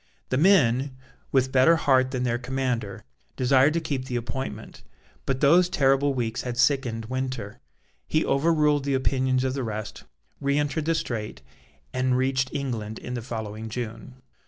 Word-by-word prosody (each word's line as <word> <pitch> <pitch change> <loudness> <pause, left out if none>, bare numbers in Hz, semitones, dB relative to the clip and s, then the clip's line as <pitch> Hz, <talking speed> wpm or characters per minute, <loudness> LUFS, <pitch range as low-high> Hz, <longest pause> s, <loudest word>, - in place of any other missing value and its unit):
The 130 - 0
men, 135 -6 +3 0.3
with 130 -1 +2
better 130 +6 +5
heart 130 -5 +3
than 130 -1 -2
their 120 -1 0
commander, 125 -5 -3 0.3
desired 130 +3 +4
to 170 - +1
keep 140 -5 -3
the 130 -2 -4
appointment. 120 +3 -5 0.5
But 135 -1 -1
those 170 +5 +5
terrible 140 -4 +2
weeks 115 -2 -2
had 125 -1 -5
sickened 120 -4 +1
Winter. 130 -4 -4 0.5
He 155 - +1
overruled 150 -1 +2
the 140 -1 0
opinions 130 -1 +1
of 130 -1 0
the 135 - -3
rest, 110 -2 -6 0.3
re 140 0 0
entered 150 +1 -1
the 165 +1 +1
Strait, 105 - -4 0.5
and 130 0 +1
reached 130 0 +1
England 115 -6 -4
in 125 - -7
the 120 - -3
following 110 -1 -6
June. 120 +2 -6
130 Hz, 160 wpm, -25 LUFS, 120-140 Hz, 0.5 s, better